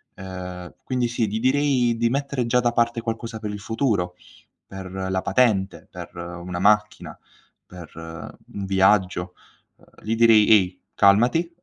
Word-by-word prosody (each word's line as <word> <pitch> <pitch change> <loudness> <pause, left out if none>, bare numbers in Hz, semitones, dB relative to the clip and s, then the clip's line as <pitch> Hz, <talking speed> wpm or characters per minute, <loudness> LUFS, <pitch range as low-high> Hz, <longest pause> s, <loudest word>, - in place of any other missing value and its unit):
Ehm, 90 -1 -8
quindi 125 -2 -1
sì, 115 -2 -1
gli 110 +2 -3
direi 130 -3 +2
di 115 0 +1
mettere 140 -1 -2
già 125 +1 +2
da 120 -1 +1
parte 120 0 0
qualcosa 115 0 -5
per 105 -1 -5
il 105 - -6
futuro, 100 -5 -1 0.5
per 95 -1 -8
la 95 0 -2
patente, 105 -7 +1
per 90 -2 -10
una 85 +1 -6
macchina, 105 +2 +1 0.5
per 90 -3 -12
un 80 +4 -9
viaggio; 95 -2 +2 0.4
uhm, - - -24 0.2
gli 110 - -1
direi: 115 -2 +5
"Ehi, 95 -4 +3
calmati, 120 +12 +3
105 Hz, 145 wpm, -23 LUFS, 95-120 Hz, 0.5 s, direi